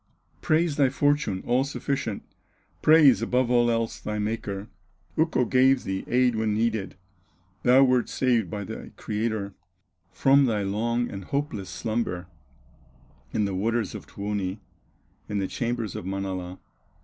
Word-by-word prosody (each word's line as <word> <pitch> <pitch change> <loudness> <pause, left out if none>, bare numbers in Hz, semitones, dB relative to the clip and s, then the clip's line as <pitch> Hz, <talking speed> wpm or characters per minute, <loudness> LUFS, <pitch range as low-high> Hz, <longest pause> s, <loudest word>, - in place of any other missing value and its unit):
Praise 160 -1 +1
thy 140 -3 +4
fortune, 145 -8 +1
all 125 +2 +2
sufficient, 135 -5 -3 0.6
Praise, 150 -6 +6
above 125 +1 +1
all 120 -1 +4
else, 115 -1 -1
thy 105 0 -4
Maker. 105 -1 -3 0.5
Ukko 160 -6 +2
gave 130 +2 +4
thee 95 -3 -3
aid 125 -1 +3
when 110 -1 0
needed, 110 -3 -1 0.7
Thou 130 +2 +6
wert 125 -2 +2
saved 120 -7 +1
by 100 +1 -4
thy - - -7
Creator, 105 -2 -2 0.6
From 135 +7 +4
thy 110 -5 0
long 115 +5 0
and 95 -2 -7
hopeless 140 - -3
slumber, 110 -6 -2 1.1
In 105 - +1
the 100 - -2
waters 110 +2 -1
of - - -8
Tuoni, 100 -1 -3 0.7
In 105 - -2
the 95 -1 0
chambers 120 -3 -3
of - - -5
Manala. 95 -1 -4
115 Hz, 135 wpm, -26 LUFS, 100-130 Hz, 1.1 s, Praise